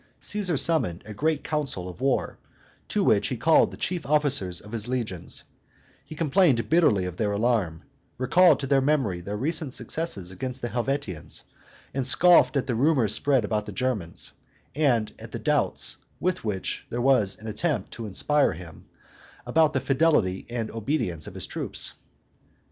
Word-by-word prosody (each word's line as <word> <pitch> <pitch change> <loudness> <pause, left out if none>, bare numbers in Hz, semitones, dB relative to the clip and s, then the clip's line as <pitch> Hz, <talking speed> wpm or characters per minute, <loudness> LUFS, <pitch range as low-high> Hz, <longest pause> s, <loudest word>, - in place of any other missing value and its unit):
Caesar 195 -7 -1
summoned 125 - +2
a 110 - -8
great 155 +6 0
council 140 - -2
of 90 +6 -10
war, 135 -1 0 0.5
to - - 0
which - - +3
he - - -3
called - - +4
the - - -11
chief 175 -3 -2
officers 140 - +1
of 105 - -13
his 115 -1 -4
legions; 115 -9 -3 0.6
he 150 +3 -10
complained 155 -5 +2
bitterly 150 - +3
of 90 -1 -6
their 105 -2 0
alarm, 100 -7 0 0.3
recalled 155 +5 +5
to 140 - -3
their 135 0 +3
memory 130 -11 +1
their 100 +4 -5
recent 155 +1 -1
success 165 -7 -3
against 125 +7 -5
the 120 - -1
Helvetians, 120 - -3 0.5
and 135 -1 -1
scoffed 145 -4 +5
at 130 - 0
the 130 - -1
rumors 125 -4 +3
spread 135 +3 +3
about 105 -1 -2
the - - -5
Germans, 105 -7 -2 0.4
and 125 -7 +1
at - - -10
the - - -2
doubts - - 0 0.2
with 185 0 -1
which 105 -4 -3
there 120 - -3
was 120 -6 +3
an 110 - -13
attempt 110 - -2
to 115 -2 -6
inspire 145 +9 +2
him 80 0 -11 0.6
about 155 -1 +3
the 130 - +1
fidelity 130 - +1
and 120 -2 -3
obedience 110 - -2
of - - -9
his - - -4
troops. - - -4
125 Hz, 165 wpm, -26 LUFS, 105-150 Hz, 0.6 s, recalled